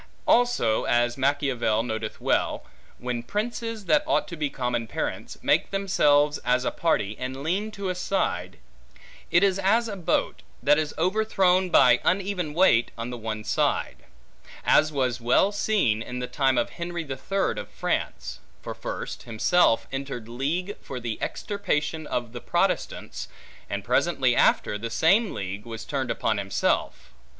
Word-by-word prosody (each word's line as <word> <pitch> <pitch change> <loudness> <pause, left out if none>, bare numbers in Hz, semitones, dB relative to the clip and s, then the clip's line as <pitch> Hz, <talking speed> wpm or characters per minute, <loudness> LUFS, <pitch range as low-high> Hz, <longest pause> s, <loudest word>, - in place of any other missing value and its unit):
Also, 240 - +3
as 120 0 +2
Machiavel 135 -5 +1
noteth 110 -2 -4
well, - - 0 0.3
when 125 -1 -3
princes, 225 - -3
that 295 +9 +4
ought - - +1
to 170 - -6
be 150 -3 -1
common 125 -4 -2
parents, - - -4
make - - +2
themselves 150 -7 +2
as 125 0 +1
a - - +1
party, 110 -11 0
and 130 +2 -5
lean 195 +7 -1
to 200 -2 -5
a 185 - 0
side, 175 - -2 0.7
it 175 +3 +4
is 195 -1 +3
as 220 +5 +2
a 210 - -4
boat, 175 -3 -1 0.2
that 145 +3 +5
is 155 -1 -3
overthrown 185 0 +2
by 125 -7 +6
uneven 185 -5 0
weight 165 -10 +4
on 115 +2 -4
the 125 - -5
one 110 -1 -4
side; - - 0 0.7
as 155 0 +4
was 130 -4 -1
well 125 +12 +3
seen, 205 - +1
in 125 +2 -6
the 125 - -2
time 135 0 +1
of 120 - 0
Henry 170 0 -4
the 135 -4 -5
Third 195 +9 -1
of - - -7
France; - - -3 0.2
for - - -5
first, - - -6
himself 115 +3 +3
entered 135 -4 -5
league 155 - -2
for 130 - -6
the 115 -2 -5
extirpation 160 -6 -2
of 120 -1 -3
the 120 - -7
Protestants; - - -1 0.4
and - - -3
presently - - +2
after, 105 - +2
the 115 +2 -4
same 195 - +3
league 95 +2 -5
was 115 -1 -7
turned 135 -2 -2
upon 110 -2 0
himself. 95 -1 -1
145 Hz, 160 wpm, -26 LUFS, 120-185 Hz, 0.7 s, by